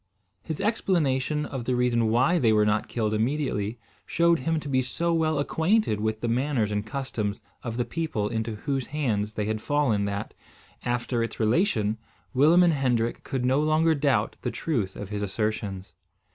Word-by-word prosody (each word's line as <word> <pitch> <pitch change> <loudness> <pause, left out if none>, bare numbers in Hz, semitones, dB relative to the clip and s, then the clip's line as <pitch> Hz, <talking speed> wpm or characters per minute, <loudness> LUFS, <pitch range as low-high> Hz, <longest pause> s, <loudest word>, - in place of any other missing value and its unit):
His 160 +4 -5
explanation 150 - +1
of 130 -4 -5
the 125 - +1
reason 120 -2 +2
why 130 +10 +3
they 115 -6 +4
were 105 -1 +4
not 105 +1 +1
killed 110 -3 -1
immediately 115 -2 -1 0.3
showed 170 0 +3
him 160 +5 0
to - - -8
be 130 -2 +2
so 170 +7 -1
well 160 -2 +1
acquainted 160 - +1
with 110 0 -1
the 120 - -1
manners 120 -2 0
and 105 0 -1
customs 110 -4 -4 0.2
of 115 -1 -5
the 120 - 0
people 160 -11 -2
into 110 0 -2
whose 135 +4 -2
hands 110 -8 -1
they 105 - -2
had 110 0 -2
fallen, 130 -9 +1
that, 100 +1 -4 0.5
after 120 0 -1
its 115 - -3
relation, 110 - +1 0.3
Willem 155 +7 +6
and 170 -2 +4
Hendrik 125 -5 0
could 130 -3 -2
no 130 +2 +3
longer 155 +1 +3
doubt 140 -8 +1
the - - -1
truth 115 -13 -2
of 100 - -7
his 105 -1 -3
assertions. 100 -1 -3
125 Hz, 175 wpm, -26 LUFS, 110-150 Hz, 0.5 s, Willem